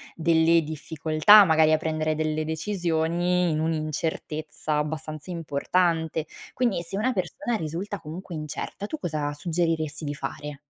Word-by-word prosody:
delle 165 Hz, 0 st, +4 dB
difficoltà 155 Hz, +6 st, +5 dB
magari 160 Hz, -3 st, +4 dB
a -, -, +5 dB
prendere 155 Hz, 0 st, -1 dB
delle 155 Hz, 0 st, -1 dB
decisioni, 175 Hz, +1 st, 0 dB
in 155 Hz, -, 0 dB
un'incertezza 155 Hz, -1 st, -2 dB
abbastanza 155 Hz, +1 st, -4 dB
importante, 165 Hz, 0 st, 0 dB, 0.3 s
quindi 235 Hz, -8 st, 0 dB
se 175 Hz, +3 st, -3 dB
una 250 Hz, +5 st, +1 dB
persona 230 Hz, -, -2 dB
risulta 180 Hz, +5 st, -4 dB
comunque 165 Hz, +4 st, -8 dB
incerta, 155 Hz, +5 st, -5 dB
tu 315 Hz, -, -4 dB
cosa 150 Hz, -, -2 dB
suggeriresti 160 Hz, -1 st, -1 dB
di 145 Hz, -, -2 dB
fare? 145 Hz, +1 st, -6 dB
160 Hz, 130 wpm, -26 LUFS, 155-175 Hz, 0.3 s, difficoltà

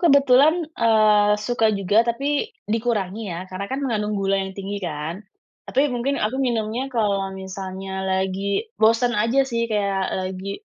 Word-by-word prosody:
kebetulan, 280 Hz, +1 st, +5 dB
eee, 215 Hz, -4 st, +4 dB
suka 225 Hz, 0 st, +1 dB
juga 205 Hz, +2 st, +3 dB
tapi 280 Hz, -, 0 dB, 0.2 s
dikurangi 215 Hz, -2 st, -2 dB
ya 170 Hz, -, -4 dB
karena 185 Hz, +1 st, -5 dB
kan 265 Hz, -, -3 dB
mengandung 210 Hz, -4 st, -1 dB
gula 195 Hz, 0 st, +1 dB
yang 190 Hz, 0 st, -6 dB
tinggi 200 Hz, +1 st, -5 dB
kan, 165 Hz, +2 st, -4 dB, 0.5 s
tapi 275 Hz, +2 st, +2 dB
mungkin 255 Hz, +3 st, -1 dB
aku 235 Hz, +6 st, -1 dB
minumnya 235 Hz, +1 st, -1 dB
kalau 205 Hz, -5 st, 0 dB
misalnya 190 Hz, 0 st, -6 dB
lagi 190 Hz, -, -1 dB
bosen 230 Hz, +2 st, +4 dB
aja 230 Hz, +6 st, +2 dB
sih, 235 Hz, -2 st, -1 dB
kayak 200 Hz, -2 st, 0 dB
lagi 190 Hz, +2 st, -4 dB
210 Hz, 145 wpm, -22 LUFS, 195-240 Hz, 0.5 s, kebetulan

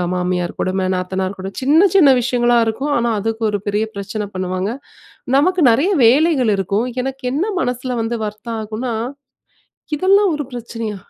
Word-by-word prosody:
மாமியார் 180 Hz, -1 st, -1 dB
கொடும, 185 Hz, 0 st, -1 dB
நாத்தனார் 185 Hz, +1 st, -2 dB
கொடும 190 Hz, +1 st, -6 dB
சின்ன, 315 Hz, +8 st, +5 dB
சின்ன 330 Hz, -8 st, +7 dB
விஷயங்களா 240 Hz, 0 st, +2 dB
இருக்கும். 265 Hz, +7 st, -2 dB
ஆனா, 235 Hz, 0 st, 0 dB
அதுக்கு 225 Hz, +2 st, -3 dB
ஒரு 205 Hz, -, -1 dB
பெரிய 205 Hz, +2 st, 0 dB
பிரச்சன 205 Hz, +1 st, -4 dB
பண்ணுவாங்க. 185 Hz, +1 st, -2 dB, 0.7 s
நமக்கு 360 Hz, +3 st, +2 dB
நெறைய 285 Hz, -, +2 dB
வேலைகள் 270 Hz, -1 st, +4 dB
இருக்கும். 200 Hz, +5 st, -1 dB, 0.2 s
எனக்கு 270 Hz, 0 st, -5 dB
என்ன 315 Hz, +7 st, 0 dB, 0.2 s
மனசுல 250 Hz, 0 st, -2 dB
வந்து 230 Hz, +1 st, -2 dB
வர்த்தம் 215 Hz, +2 st, -6 dB
ஆகுன்னா. 225 Hz, +3 st, -4 dB, 1.0 s
இதெல்லாம் 390 Hz, +3 st, +3 dB
ஒரு 295 Hz, -, -3 dB
பிரச்சனையா? 230 Hz, -3 st, -5 dB
230 Hz, 145 wpm, -18 LUFS, 200-270 Hz, 1.0 s, சின்ன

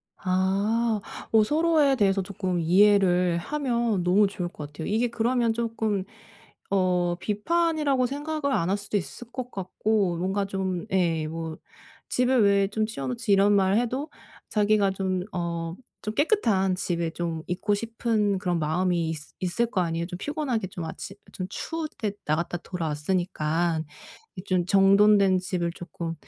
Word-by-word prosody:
아. 200 Hz, +4 st, +1 dB, 0.3 s
어 220 Hz, -1 st, +6 dB
서로에 305 Hz, +1 st, +3 dB
대해서 195 Hz, -4 st, +2 dB
조금 185 Hz, -2 st, -3 dB
이해를 180 Hz, 0 st, +4 dB
하면 235 Hz, -3 st, -1 dB
너무 195 Hz, +4 st, +4 dB
좋을 180 Hz, -3 st, -4 dB
것 150 Hz, -3 st, -9 dB
같아요. 155 Hz, +2 st, -6 dB
이게 225 Hz, +4 st, +1 dB
그러면 235 Hz, 0 st, +1 dB
조금 220 Hz, -3 st, -1 dB, 0.7 s
어 180 Hz, -2 st, +2 dB
비판이라고 290 Hz, -, +1 dB
생각을 290 Hz, +1 st, -2 dB
안 170 Hz, -7 st, +1 dB
할 195 Hz, -, +2 dB
수도 205 Hz, +1 st, -2 dB
있을 200 Hz, -, -7 dB
것 250 Hz, -1 st, -5 dB
같고 195 Hz, -1 st, 0 dB
뭔가 190 Hz, +3 st, -1 dB
좀 190 Hz, -2 st, -3 dB
예 165 Hz, -4 st, +1 dB
뭐 160 Hz, 0 st, -5 dB, 0.5 s
"집에 250 Hz, +1 st, +2 dB
왜 200 Hz, -3 st, +4 dB
좀 215 Hz, +1 st, 0 dB
치워 140 Hz, -12 st, -5 dB
놓지." 125 Hz, -, -2 dB
이런 200 Hz, +1 st, +5 dB
말 195 Hz, 0 st, +3 dB
해도 255 Hz, +6 st, -1 dB, 0.4 s
자기가 210 Hz, -2 st, +3 dB
좀 190 Hz, -1 st, -2 dB
어 170 Hz, -1 st, -3 dB, 0.3 s
좀 215 Hz, -, -3 dB
깨끗한 215 Hz, -, +2 dB
집에 170 Hz, -2 st, -1 dB
좀 165 Hz, -2 st, -3 dB
있고 190 Hz, +4 st, 0 dB
싶은 220 Hz, -2 st, 0 dB
그런 180 Hz, -3 st, -1 dB
마음이 170 Hz, +1 st, 0 dB
있으 150 Hz, -2 st, -8 dB
있을거 190 Hz, +3 st, 0 dB
아니에요. 165 Hz, -1 st, -1 dB
'좀 180 Hz, -, -6 dB
피곤하게 260 Hz, -, -2 dB
좀 175 Hz, -2 st, -6 dB
아침 195 Hz, +4 st, -7 dB, 0.2 s
좀 185 Hz, -, -4 dB
추울 325 Hz, -1 st, -4 dB
때 210 Hz, -3 st, -1 dB
나갔다 165 Hz, +3 st, -1 dB
돌아왔으니까. 165 Hz, 0 st, -1 dB, 0.6 s
이 180 Hz, -, -6 dB
좀 185 Hz, -3 st, +1 dB
정돈된 195 Hz, 0 st, +5 dB
집을 180 Hz, -2 st, -2 dB
조금 170 Hz, -2 st, -6 dB
195 Hz, 290 characters per minute, -26 LUFS, 175-225 Hz, 0.7 s, 어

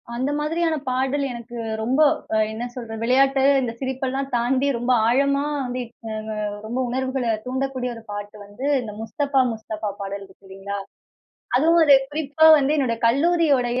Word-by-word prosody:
அந்த 260 Hz, +4 st, -1 dB
மாதிரியான 325 Hz, +2 st, 0 dB
பாடல் 265 Hz, +2 st, 0 dB
எனக்கு 235 Hz, 0 st, -8 dB, 0.2 s
ரொம்ப 260 Hz, +7 st, +1 dB, 0.3 s
அ -, -, +3 dB
என்ன 225 Hz, +2 st, -4 dB
சொல்றது? 225 Hz, -3 st, -6 dB
விளையாட்டு, 270 Hz, +2 st, +3 dB, 0.2 s
இந்த 240 Hz, -, -2 dB
சிரிப்பெல்லாம் 265 Hz, +1 st, -3 dB
தாண்டி 255 Hz, +3 st, +1 dB
ரொம்ப 245 Hz, +2 st, -1 dB, 0.2 s
ஆழமா 280 Hz, +3 st, +2 dB, 0.2 s
வந்து 250 Hz, 0 st, -4 dB
இப்ப 230 Hz, -1 st, -14 dB, 0.2 s
ம 220 Hz, -, -4 dB, 0.3 s
ரொம்ப 240 Hz, +4 st, -3 dB
உணர்வுகள 260 Hz, 0 st, -2 dB, 0.2 s
தூண்டக்கூடிய 260 Hz, 0 st, -2 dB
ஒரு 230 Hz, -, -11 dB
பாட்டு 205 Hz, +1 st, -6 dB
வந்து, 205 Hz, +7 st, -8 dB, 0.2 s
இந்த 215 Hz, -3 st, -7 dB
முஸ்தபா 275 Hz, +4 st, 0 dB
முஸ்தபா 220 Hz, -1 st, -5 dB
பாடல் 200 Hz, 0 st, -5 dB
இருக்கு 195 Hz, +1 st, -21 dB
இல்லீங்களா? 195 Hz, +1 st, -6 dB, 0.8 s
அதுவும் 330 Hz, +5 st, +4 dB
அது 285 Hz, -3 st, +8 dB
குறிப்பா 305 Hz, +1 st, +2 dB
வந்து, 285 Hz, +2 st, +1 dB
என்னோட 255 Hz, -5 st, 0 dB
கல்லூரியுடைய 275 Hz, -3 st, +2 dB
255 Hz, 150 wpm, -23 LUFS, 230-275 Hz, 0.8 s, அது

